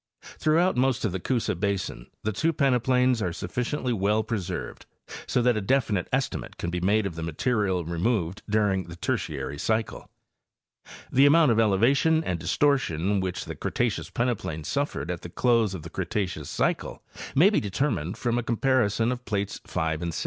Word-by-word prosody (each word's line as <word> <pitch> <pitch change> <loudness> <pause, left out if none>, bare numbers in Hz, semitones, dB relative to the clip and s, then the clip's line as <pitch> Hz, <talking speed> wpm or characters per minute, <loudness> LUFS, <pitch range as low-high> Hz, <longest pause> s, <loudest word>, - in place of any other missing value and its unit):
Throughout 170 +4 +3
most 130 -2 +1
of 105 - 0
the 95 - -3
Coosa 120 +5 0
basin 95 - -2 0.2
the 110 - 0
two 160 +11 +1
peneplains 125 -3 +2
are 90 - 0
sufficiently 125 - -2
well 105 +1 +1
pre 110 0 -2
served 90 -1 -6 0.4
so 125 - +1
that 125 -1 +3
a 110 - -1
definite 110 -4 +1
estimate 135 0 -2
can 85 - -3
be 90 - -2
made 100 +4 +2
of 95 - -3
the 80 - -6
material 95 +2 0
removed 85 +2 -1
during 100 -3 +1
the 85 - -9
Tertiary 75 -4 -3
cycle. 110 +3 -2 1.0
The 135 +2 +6
amount 155 -2 +5
of 115 - +2
.elevation 130 +10 +3
and 90 - -2
distortion 100 - +1
which 95 -1 -3
the - - -5
Cretaceous - - -2
peneplain 115 -10 -2
suffered 140 - -2
at 85 - -5
the 85 - -8
close 115 -1 +2
of 80 - -7
the 85 - -8
Cretaceous 90 -6 -3
cycle - - -1 0.3
may 180 +9 +6
be - - +3
determined 100 - -2
from 120 -1 0
a - - -3
compar 130 +2 +2
ison 115 +3 0
of 125 0 -4
plates 100 -1 -2
5 80 -2 -1
and 85 -1 -3
6. - - -2
105 Hz, 180 wpm, -26 LUFS, 90-125 Hz, 1.0 s, The